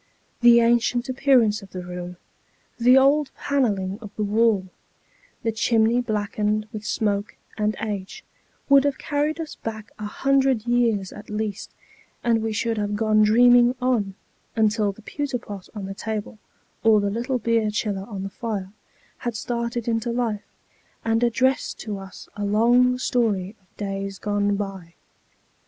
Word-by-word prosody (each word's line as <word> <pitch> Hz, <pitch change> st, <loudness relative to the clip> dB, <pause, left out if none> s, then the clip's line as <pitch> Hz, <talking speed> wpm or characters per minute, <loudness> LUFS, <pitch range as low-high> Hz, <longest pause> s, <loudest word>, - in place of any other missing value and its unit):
The 240 Hz, -1 st, +7 dB
ancient 240 Hz, +2 st, +2 dB
appearance 250 Hz, -5 st, +3 dB
of 195 Hz, -2 st, -14 dB
the 180 Hz, -1 st, -6 dB
room 180 Hz, 0 st, -7 dB, 0.6 s
the 250 Hz, +2 st, +6 dB
old 280 Hz, +2 st, +4 dB
panelling 205 Hz, -8 st, 0 dB
of 210 Hz, -, -8 dB
the 215 Hz, -, -1 dB
wall 210 Hz, -1 st, +2 dB, 0.8 s
the 225 Hz, -, +1 dB
chimney 225 Hz, +2 st, +2 dB
blackened 215 Hz, -1 st, -1 dB
with 215 Hz, -1 st, -6 dB
smoke 210 Hz, -1 st, -1 dB, 0.2 s
and 215 Hz, 0 st, 0 dB
age 205 Hz, -3 st, -5 dB, 0.4 s
would 275 Hz, -1 st, +6 dB
have 285 Hz, -2 st, 0 dB
carried 300 Hz, +2 st, -1 dB
us 320 Hz, -2 st, -5 dB
back 220 Hz, -2 st, -6 dB
a 210 Hz, -, -4 dB
hundred 270 Hz, -1 st, +1 dB
years 230 Hz, -5 st, +1 dB
at 210 Hz, -, -11 dB
least, 210 Hz, -1 st, -3 dB, 0.5 s
and 230 Hz, -2 st, +2 dB
we 225 Hz, 0 st, -1 dB
should 225 Hz, 0 st, -1 dB
have 205 Hz, 0 st, -1 dB
gone 215 Hz, 0 st, +3 dB
dreaming 245 Hz, +3 st, +6 dB
on, 235 Hz, -7 st, 0 dB, 0.4 s
until 215 Hz, -2 st, +2 dB
the 205 Hz, +2 st, -16 dB
pewter 285 Hz, +1 st, -3 dB
pot 200 Hz, -5 st, -9 dB
on 205 Hz, -2 st, -5 dB
the 195 Hz, -, -5 dB
table, 215 Hz, +1 st, -5 dB, 0.4 s
or 220 Hz, -2 st, +6 dB
the 200 Hz, 0 st, 0 dB
little 245 Hz, +4 st, -1 dB
beer 230 Hz, -2 st, +1 dB
chiller 205 Hz, -2 st, -2 dB
on 195 Hz, -3 st, -5 dB
the 195 Hz, -, -4 dB
fire, 205 Hz, -4 st, -4 dB, 0.5 s
had 240 Hz, -2 st, -3 dB
started 235 Hz, +1 st, -3 dB
into 230 Hz, 0 st, 0 dB
life, 230 Hz, -4 st, -2 dB, 0.6 s
and 225 Hz, 0 st, +2 dB
addressed 255 Hz, +3 st, +1 dB
to 205 Hz, -3 st, -5 dB
us 195 Hz, -1 st, -11 dB
a 205 Hz, -, -4 dB
long 240 Hz, +5 st, +4 dB
story 215 Hz, -6 st, 0 dB
of 185 Hz, -, -36 dB
days 195 Hz, -1 st, -4 dB
gone 205 Hz, 0 st, 0 dB
by. 195 Hz, -4 st, -6 dB
220 Hz, 155 wpm, -24 LUFS, 205-240 Hz, 0.8 s, The